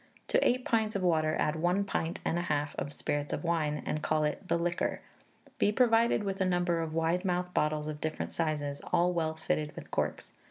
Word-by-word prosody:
To - - +3
eight 250 +1 +2
pints 220 -2 +1
of 195 - -1
water, 155 -3 +2
add 150 +1 +1
one 175 +5 +2
pint 170 -4 -2
and 170 - +1
a - - 0
half 150 -3 -1
of 145 - -3
spirits 145 0 -2
of - - -3
wine, 155 -3 0
and 155 - -2
call 155 0 +1
it 150 +5 -2
'the 170 - +2
liquor.' 175 +1 -1 0.6
Be 205 - +4
provided 230 -1 +3
with 195 -1 -2
a - - +5
number 175 -2 +1
of 160 -1 -3
wide 165 +3 +1
mouthed 180 -1 -1
bottles 150 0 +1
of 150 -1 -5
different 155 0 -3
sizes, 150 -3 -2
all 175 +1 +3
well 160 -2 0
fitted 155 -2 -2
with - - -9
corks. - - -2
165 Hz, 210 wpm, -31 LUFS, 155-180 Hz, 0.6 s, a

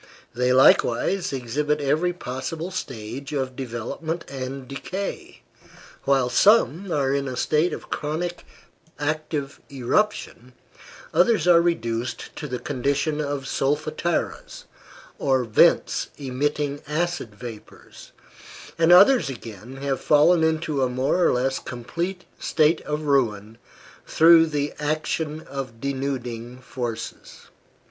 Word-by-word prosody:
They 125 +1 +1
likewise 130 +7 +4
exhibit 145 +4 -1
every 155 +5 +1
possible 160 +3 -5
stage 135 -4 -6
of 130 -2 -2
development 135 +7 -4
and 130 0 -6
decay: 185 +9 -6 0.6
while 135 -2 +3
some 195 - +3
are 140 -3 +1
in 140 0 -1
a 130 -1 -5
state 155 +6 +2
of - - -8
chronic 170 +4 -3 0.5
active 150 -1 -3
eruption, 130 - -1 0.6
others 175 0 +3
are 170 -1 +7
reduced 120 -8 -2
to 150 - -5
the 125 -2 -3
condition 140 +4 -1
of 145 -2 -3
solfataras, 155 +5 -2 0.6
or 130 -2 +2
vents 110 -3 +3
emitting 145 +2 -2
acid 160 -7 -2
vapors, 115 -1 -11 0.7
and 165 +1 +4
others 185 - +7
again 115 -1 -9
have 135 -1 -2
fallen 160 +3 +4
into 160 -3 0
a 130 - +2
more 130 +8 +1
or - - +4
less 130 +2 0
complete 170 +10 -5
state 155 +1 +2
of 150 +1 -2
ruin 115 -6 0 0.5
through 165 0 +6
the 145 -1 -2
action 155 +1 -2
of 135 -6 -7
denuding 125 -3 -4
forces. 120 -3 -7
140 Hz, 115 wpm, -24 LUFS, 130-160 Hz, 0.7 s, are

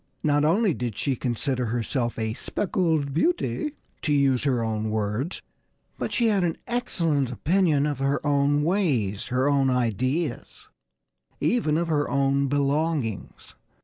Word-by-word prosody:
Not 145 -1 +2
only 190 +5 +3
did 120 -5 -4
she 135 - 0
consider 125 +1 -2
herself 120 +1 -2
a 110 -1 -1
"speckled 160 - -1
beauty" 305 - 0 0.3
(to 150 - -1
use 140 -2 +2
her 125 -4 +1
own 110 -1 -2
words) 110 - -2 0.6
but - - -2
she 240 - +1
had 205 -4 +2
an 170 -2 0
excellent 165 - -1
opinion 155 +1 +2
of 145 -3 -2
her 135 +1 +1
own 145 0 +2
ways, 140 - 0
her 130 +2 +1
own 140 -2 +3
ideas 125 - -2 0.7
even 160 -11 +1
of 170 0 0
her 145 -2 +1
own 140 0 +2
belongings. 140 - -1
140 Hz, 140 wpm, -25 LUFS, 125-160 Hz, 0.7 s, only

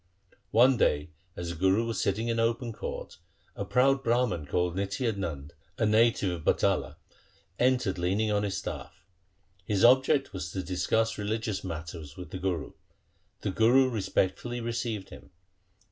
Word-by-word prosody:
One 125 +3 +5
day, 75 -5 +1 0.2
as 85 -1 -5
the - - -6
Guru 95 +6 +2
was 115 -1 -2
sitting 105 +4 0
in 115 -1 0
open 115 +1 0
court, - - -7 0.4
a - - -3
proud 135 +6 +2
Brahman 115 - +1
called 90 +3 0
Nitya 100 +5 -1
Nand, 75 -8 -5 0.3
a 110 - +1
native 110 -2 +3
of 85 -3 -5
Batala, - - +1 0.6
entered 125 -7 +2
leaning 100 +5 +1
on 105 0 +2
his 100 -1 -2
staff. 95 - -7 0.6
His 100 0 0
object 130 +3 +4
was 90 -2 -5
to 95 - -3
discuss 95 +6 0
religious 110 0 -2
matters 80 -3 -7
with 90 - -9
the 95 - -5
Guru. 90 -2 -2 0.7
The - - -1
Guru 125 +6 +4
respectfully 110 +2 -1
received 115 -3 -3
him. - - -12
105 Hz, 150 wpm, -29 LUFS, 90-115 Hz, 0.7 s, One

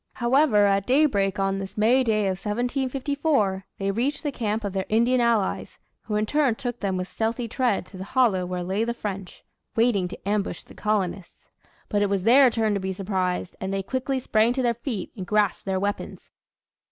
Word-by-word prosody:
However, 240 -3 +3
at 195 -1 +1
daybreak 250 -9 +2
on 195 0 0
this 195 +1 -7
May 240 +5 +4
day 220 -3 +1
of 190 -2 -2
1754, 255 -2 0
they 195 0 -1
reached 260 +9 -1
the 295 - -1
camp 220 -3 -2
of 200 -2 -3
their 190 -1 -2
Indian 240 +3 +3
allies; 230 -4 0 0.3
who 210 - -2
in 210 0 +1
turn 280 -1 +2
took 245 -1 -5
them 190 -2 -1
with 185 0 -3
stealthy 225 +5 -2
tread 235 -5 0
to 190 - -12
the 185 - -5
hollow 210 -4 +2
where 180 0 -3
lay 190 +5 -1
the 235 +1 -2
French 195 -4 -6 0.3
waiting 225 -5 +2
to 180 - -10
ambush 205 -1 -1
the - - -16
colonists. 195 -4 -3 0.4
But 205 - 0
it 205 - +2
was 195 -2 0
their 255 +4 +7
turn 220 -2 0
to 200 - 0
be 190 0 -3
surprised, 185 -2 -2
and 190 - -3
they 195 0 -1
quickly 260 +5 -2
sprang 230 -1 +2
to 260 0 -1
their 240 -1 +2
feet 235 -4 -5
and 195 - -5
grasped 210 0 +1
their 190 -1 0
weapons. 200 +1 -4
210 Hz, 200 wpm, -25 LUFS, 195-245 Hz, 0.4 s, their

